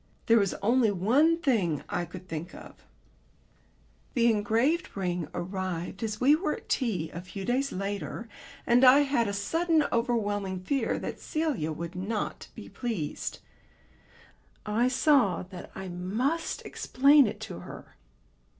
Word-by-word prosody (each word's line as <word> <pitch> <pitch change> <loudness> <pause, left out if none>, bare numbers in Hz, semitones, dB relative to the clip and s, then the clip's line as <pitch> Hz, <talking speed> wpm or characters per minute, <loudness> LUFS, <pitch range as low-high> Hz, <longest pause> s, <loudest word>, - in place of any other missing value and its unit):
There 230 0 +5
was 200 -2 0
only 235 +1 +4
one 250 - +3
thing 215 - 0
I 175 - -2
could 180 +2 -11
think 165 +1 -6
of. - - -13 1.3
The 235 -1 +4
engraved 225 - 0
ring 180 -3 -2
arrived 185 0 -4
as 215 -2 -3
we 280 +4 +5
were 310 -1 -1
at - - -13
tea 185 - -1
a 170 - -6
few 190 +2 -7
days 270 +3 0
later, 200 +4 -4 0.4
and 245 +2 +4
I 265 +3 +8
had 275 -5 +1
a - - -1
sudden 320 +10 +1
overwhelming 205 -6 -1
fear 250 +4 0
that - - -5
Celia 290 - -2
would 170 +3 -5
not 200 +4 -4
be - - -9
pleased. 220 - -4 1.2
I 220 +4 +2
saw 260 - +3
that 180 -1 -10
I 190 0 -6
must 215 - -2
explain 280 0 +4
it 205 - -5
to - - -6
her. - - -11
215 Hz, 140 wpm, -28 LUFS, 185-265 Hz, 1.3 s, I